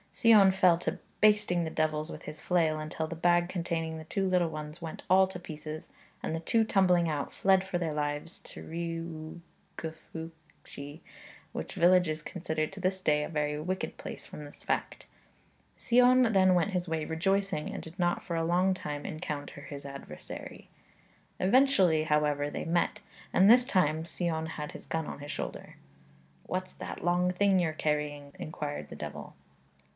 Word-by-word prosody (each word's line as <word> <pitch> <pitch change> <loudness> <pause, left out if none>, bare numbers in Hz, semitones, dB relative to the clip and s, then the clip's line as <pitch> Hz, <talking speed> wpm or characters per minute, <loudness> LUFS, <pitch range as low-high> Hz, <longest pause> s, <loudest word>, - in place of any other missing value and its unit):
Sion 210 -4 +6
fell 180 -2 +5
to - - -2 0.2
basting 210 -5 +4
the 160 - -2
devils 155 0 -1
with - - -9
his 150 - -7
flail, 160 -3 +1
until 155 +1 -3
the 170 - -5
bag 175 +1 +3
containing 165 -3 -2
the 160 - -7
two 195 +4 -1
little 180 -2 +2
ones 155 +1 -7
went 165 -1 -6
all 190 +1 +6
to 185 -1 -7
pieces, 155 -2 -7 0.3
and 160 - -1
the - - -2
two 225 +7 +2
tumbling 180 -5 +3
out, 150 -3 -2
fled 190 -1 +3
for 190 -2 -2
their 165 -3 -2
lives 150 +2 -3
to - - -11 1.2
Rhiwgyfylchi, 160 -2 -9 0.5
which - - -5
village 180 0 +5
is 155 0 -3
considered 160 -2 -3
to 195 - -8
this 190 0 0
day 150 -4 +2
a - - -4
very 150 -1 -1
wicked 185 +4 -3
place - - -7
from 150 - -9
this 145 - -12
fact. - - -2 0.7
Sion 250 -1 +5
then 185 -1 +5
went 180 +3 +2
his 180 -1 -1
way 160 -1 -1
rejoicing, 195 0 0
and - - -5
did 165 +3 -11
not 175 -1 +1
for 170 - -3
a 165 - 0
long 180 +3 +3
time 150 -5 -5
encounter 145 -2 -5
his 140 0 -8
adversary. 140 - -9 0.7
Eventually, 190 - +4
however, 150 -1 +1
they - - -4
met, 170 +1 0 0.3
and 190 +2 +5
this 245 +2 +7
time 160 -7 +2
Sion 165 -1 -2
had 150 -1 -5
his - - -11
gun 160 -1 -1
on - - -7
his 145 +1 -6
shoulder. - - -6 0.7
'What's 185 0 -3
that - - -7
long 180 +1 +3
thing 195 +1 +3
you're 165 -3 +1
carrying?' 150 -2 -2
inquired 150 -2 -5
the - - -8
devil. - - -7
165 Hz, 170 wpm, -30 LUFS, 155-185 Hz, 1.2 s, this